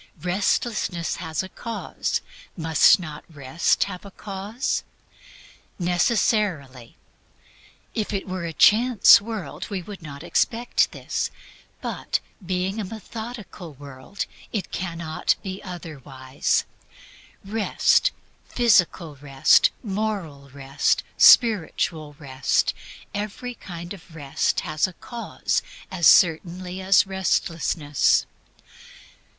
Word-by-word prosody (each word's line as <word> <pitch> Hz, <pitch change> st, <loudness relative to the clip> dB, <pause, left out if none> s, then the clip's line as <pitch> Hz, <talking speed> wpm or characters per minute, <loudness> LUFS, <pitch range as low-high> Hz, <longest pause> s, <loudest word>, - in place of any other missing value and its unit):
Restlessness 185 Hz, -2 st, -1 dB
has 160 Hz, 0 st, -3 dB
a 190 Hz, -, -8 dB
cause: 230 Hz, +4 st, -4 dB, 0.4 s
must 160 Hz, 0 st, +5 dB
not 155 Hz, -4 st, -8 dB
Rest 145 Hz, +2 st, +1 dB
have 185 Hz, -3 st, -7 dB
a 200 Hz, -, -10 dB
cause? 200 Hz, +5 st, -4 dB, 0.9 s
Necessarily. 175 Hz, -, 0 dB, 1.0 s
If 215 Hz, -, -2 dB
it 200 Hz, -2 st, -3 dB
were 185 Hz, -1 st, -4 dB
a 165 Hz, -, -3 dB
chance 225 Hz, +7 st, +6 dB
world 205 Hz, -9 st, -6 dB
we 195 Hz, -4 st, -4 dB
would 200 Hz, 0 st, -10 dB
not 140 Hz, -3 st, -9 dB
expect 240 Hz, +1 st, +1 dB
this; -, -, -3 dB, 0.5 s
but, -, -, -2 dB, 0.2 s
being 185 Hz, +3 st, -2 dB
a -, -, -2 dB
methodical 220 Hz, -4 st, -8 dB
world, 140 Hz, +7 st, -7 dB, 0.3 s
it 210 Hz, -4 st, -3 dB
cannot 170 Hz, -3 st, -1 dB
be 190 Hz, 0 st, -6 dB
otherwise. 140 Hz, -7 st, -3 dB, 0.8 s
Rest, 215 Hz, +2 st, +2 dB, 0.4 s
physical 180 Hz, -, +2 dB
rest, 135 Hz, -1 st, +4 dB
moral 195 Hz, -, -3 dB
rest, 140 Hz, +1 st, 0 dB
spiritual 165 Hz, -8 st, +4 dB
rest, 135 Hz, -3 st, 0 dB, 0.4 s
every 210 Hz, +4 st, -4 dB
kind 175 Hz, -5 st, -8 dB
of 175 Hz, -3 st, -14 dB
rest 145 Hz, -3 st, -1 dB
has 155 Hz, +2 st, 0 dB
a 185 Hz, -, -10 dB
cause, 235 Hz, +6 st, -3 dB, 0.3 s
as 175 Hz, -4 st, +3 dB
certainly 180 Hz, +2 st, +3 dB
as 190 Hz, +1 st, +5 dB
restlessness. 165 Hz, -6 st, +1 dB
180 Hz, 100 wpm, -24 LUFS, 155-205 Hz, 1.0 s, chance